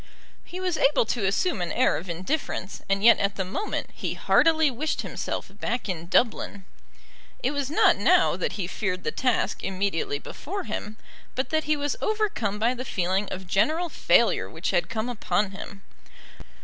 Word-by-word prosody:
He 360 - -8
was 365 -3 -1
able 275 -3 +4
to 215 -3 0
assume 200 - 0
an 175 - -2
air - - +3
of 175 +3 -6
indifference, 185 - -3
and 195 0 +1
yet 235 - +7
at 200 0 0
the 190 - -2
moment 390 - -3
he - - -4
heartily 320 -3 +4
wished 300 +6 -2
himself - - -4
back 240 0 -2
in 170 -3 -4
Dublin. 200 -2 +1 0.8
It 255 - +2
was 285 -2 -2
not 310 - +4
now - - +4
that - - -2
he 195 - -3
feared 185 0 -3
the - - -1
task 250 -2 0
immediately 190 -6 -1
before 375 - -6
him, 215 -8 -5 0.4
but 260 - -2
that 315 0 +1
he 305 +1 +2
was 290 0 -1
overcome 420 - 0
by 230 +4 +2
the 255 0 -5
feeling 190 -3 0
of 190 0 -6
general 310 - +1
failure - - +3
which - - -3
had - - +1
come 225 0 -2
upon 210 -4 0
him. 195 0 -9
225 Hz, 175 wpm, -26 LUFS, 195-295 Hz, 0.8 s, yet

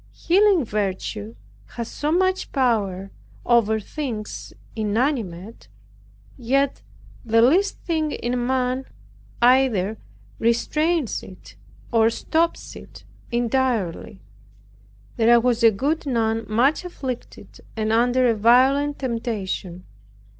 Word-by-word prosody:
Healing 380 - +3
virtue 190 - -3 0.4
has 235 -1 -4
so 295 +5 -3
much 375 +2 +1
power 200 -8 0 0.3
over 220 -2 +3
things 225 -3 -6 0.2
inanimate, 220 - -2 0.7
yet 270 +3 0 0.4
the 230 0 +2
least 370 +11 +3
thing 315 -3 -1
in 245 -1 -2
man 255 0 0 0.6
either 240 -5 +3 0.4
restrains 300 +5 0
it, 185 - -14 0.4
or 225 -1 +4
stops 330 +8 -1
it - - -13 0.3
entirely. 240 -6 -1 0.9
There 235 +1 +5
was 240 0 +1
a 230 - +7
good 285 +9 -2
nun 225 -3 0
much 255 +10 +2
afflicted 265 -9 -7 0.2
and 220 0 0
under 245 +2 +3
a 235 - +3
violent 260 +6 +3
temptation. 215 -7 -4
240 Hz, 100 wpm, -22 LUFS, 220-275 Hz, 0.9 s, a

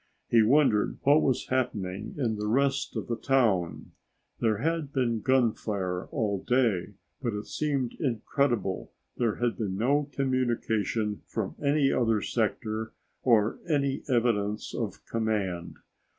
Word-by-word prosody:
He 115 - +6
wondered 115 -2 +3
what 145 +3 +5
was 130 -2 0
happening 105 -7 -2
in 120 -6 0
the 105 0 -3
rest 135 +4 +1
of - - -2
the 120 - -1
town. 110 -11 +1 0.5
There 110 -3 +2
had 160 +1 -1
been 120 -5 0
gunfire 105 -8 0
all 105 -7 -1
day, 105 -7 +1 0.3
but 120 -4 -1
it 105 - -4
seemed 140 -5 -1
incredible 120 - 0 0.3
there 115 -3 +1
had 120 -1 -1
been 95 -4 -2
no 140 +6 +1
communication 115 -5 0
from 110 -4 -3
any 140 -1 +3
other 115 -3 +2
sector 110 0 -2 0.3
or 110 -4 +3
any 140 -3 +1
evidence 110 -4 +1
of - - -4
command. 105 -6 -2
115 Hz, 130 wpm, -28 LUFS, 105-135 Hz, 0.5 s, He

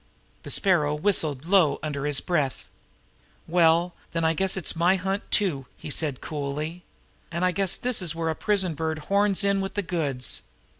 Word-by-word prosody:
The - - -9
Sparrow 160 -7 +2
whistled 150 -5 +1
low 180 -4 +4
under 145 -2 -2
his 145 -2 +1
breath. 150 -7 -1 0.8
"Well, 170 +1 +3 0.2
then, 165 -1 0
I 160 - +3
guess 190 +3 0
it's 180 - +1
my 175 +3 +3
hunt 195 +2 -1
too," 150 -11 +1
he - - -7
said 145 -4 -1
coolly. 150 +3 -4 0.5
"And 170 +2 0
I 180 - +3
guess 190 +1 0
this 245 -4 -1
is 170 -3 -2
where 165 -1 -1
a 160 - -1
prison 190 -4 +1
bird 160 +1 -2 0.2
horns 200 0 +3
in 200 -1 +2
with 195 - -5
the 205 - 0
goods. 150 -8 -2
170 Hz, 180 wpm, -25 LUFS, 150-190 Hz, 0.8 s, low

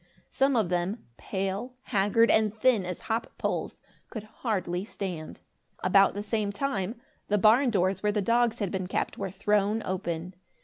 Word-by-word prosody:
Some 270 0 +2
of 215 -7 +2
them 180 +5 -1
pale, 195 +6 -3
haggard 210 +2 +3
and 220 -1 +3
thin 225 -6 +3
as 180 - -5
hop 225 +1 -2
poles, - - -3 0.3
could 220 -4 -6
hardly 190 -5 -2
stand. 185 -6 -6 0.4
About 195 +2 +5
the 205 - -3
same 210 -1 -1
time, 210 -2 -2 0.3
the 210 - +2
barn 225 +6 +5
doors 190 -3 +1
where 210 - +2
the 210 - 0
dogs 235 +3 +2
had 200 -4 -2
been 185 -1 -2
kept, - - -2
were - - -2
thrown 210 +2 +1
open. 175 -1 -3
205 Hz, 165 wpm, -28 LUFS, 190-225 Hz, 0.4 s, About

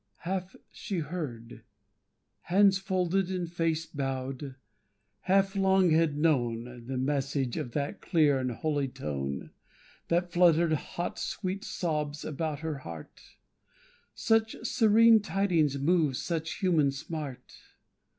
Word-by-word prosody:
Half 185 +1 -3 0.2
she 195 - -5
heard, 140 -9 -5 0.9
Hands 195 +2 +5
folded 190 0 0
and 180 -2 -2
face 165 -1 -1
bowed, 135 -1 -4 0.6
half 195 - +2
long 190 -2 +3
had 160 -2 +3
known, 120 -5 0
The 130 0 -3
message 135 -1 -1
of 120 - -4
that 145 -1 -3
clear 150 -6 +3
and 130 -1 -1
holy 145 +3 -1
tone, 70 - -5 0.6
That 175 +1 0
fluttered 170 -2 +4
hot 170 +3 -4
sweet 190 +2 -3
sobs 150 -4 -3
about 155 0 -3
her 160 -3 -3
heart; 85 - -10 0.9
Such 225 0 +2
serene 225 -1 +5
tidings 180 -9 +1
moved 155 -1 +2
such 160 +3 -3
human 170 -8 +2
smart. 140 -1 -6
160 Hz, 115 wpm, -29 LUFS, 135-180 Hz, 0.9 s, Hands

